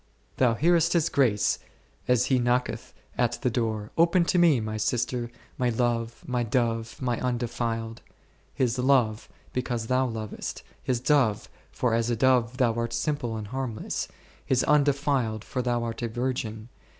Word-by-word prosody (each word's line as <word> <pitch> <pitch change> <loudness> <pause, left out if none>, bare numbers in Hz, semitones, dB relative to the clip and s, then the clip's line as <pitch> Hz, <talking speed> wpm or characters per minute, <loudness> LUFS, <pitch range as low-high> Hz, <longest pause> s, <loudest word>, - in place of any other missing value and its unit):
Thou 125 -3 +3
hearest 165 +4 +3
His 170 -3 +2
voice 120 -7 +2 0.5
as 125 -1 +3
He 130 -2 +2
knocketh 125 +1 0 0.3
at 120 -1 +2
the 125 - +2
door, 110 -3 -2
Open 170 +1 +4
to 180 - +2
Me, 165 -7 +5
My 110 0 -3
sister, 120 +2 -1 0.3
My 125 -1 +2
love, 115 -1 -1
My 125 -1 -1
dove, 115 -1 -1
My 125 -3 -1
undefiled; 115 -2 -2 0.5
His 125 -1 0
love, 125 -5 +2 0.2
because 120 -2 -2
thou 130 +2 +2
lovest; 110 -3 -5 0.2
His 125 -2 -1
dove, 125 -5 +2 0.2
for 120 -2 0
as 115 +1 +1
a 120 - +1
dove 125 0 +2
thou 125 -4 +3
art 115 0 -2
simple 120 -2 -1
and 105 -2 -6
harmless; 130 -3 -3 0.4
His 130 -2 +2
un 150 0 +4
defiled, 135 -6 0
for 125 - -3
thou 120 -1 0
art 115 0 -4
a 120 - 0
virgin. 115 -2 -3
120 Hz, 160 wpm, -27 LUFS, 115-130 Hz, 0.5 s, Me